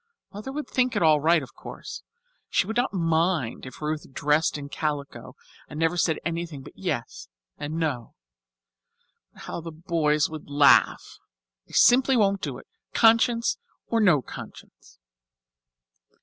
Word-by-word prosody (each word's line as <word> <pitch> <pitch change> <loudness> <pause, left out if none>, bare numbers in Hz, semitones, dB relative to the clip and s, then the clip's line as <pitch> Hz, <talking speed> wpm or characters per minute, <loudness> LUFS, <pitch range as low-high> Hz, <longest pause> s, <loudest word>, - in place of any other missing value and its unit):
Mother 210 +6 -7
would 300 +2 -5
think 255 -1 0
it - - +1
all 155 -2 +5
right, 165 0 +3
of 130 - -12
course. - - -9 0.5
She - - +2
would 220 +3 -4
not 245 +2 +1
mind 165 - 0
if 130 +4 -11
Ruth 150 -2 -3
dressed 150 +3 +1
in 140 -1 -7
calico 145 -1 -4 0.3
and 150 - -7
never 165 +1 +1
said 165 -2 +1
anything 165 -4 -4
but - - -12
yes - - -4 0.3
and 145 +2 -4
no. 150 -8 -3 1.2
But - - -14
how - - -6
the 165 0 -7
boys 155 -2 +1
would 155 -2 -9
laugh! 145 0 +4 0.5
I - - -17
simply 260 +1 +5
won't 200 -3 +2
do 140 -5 -4
it, - - -13 0.3
conscience 230 +1 +3 0.3
or 230 -1 +1
no 170 -10 +4
conscience." - - -12
160 Hz, 150 wpm, -25 LUFS, 150-195 Hz, 1.2 s, all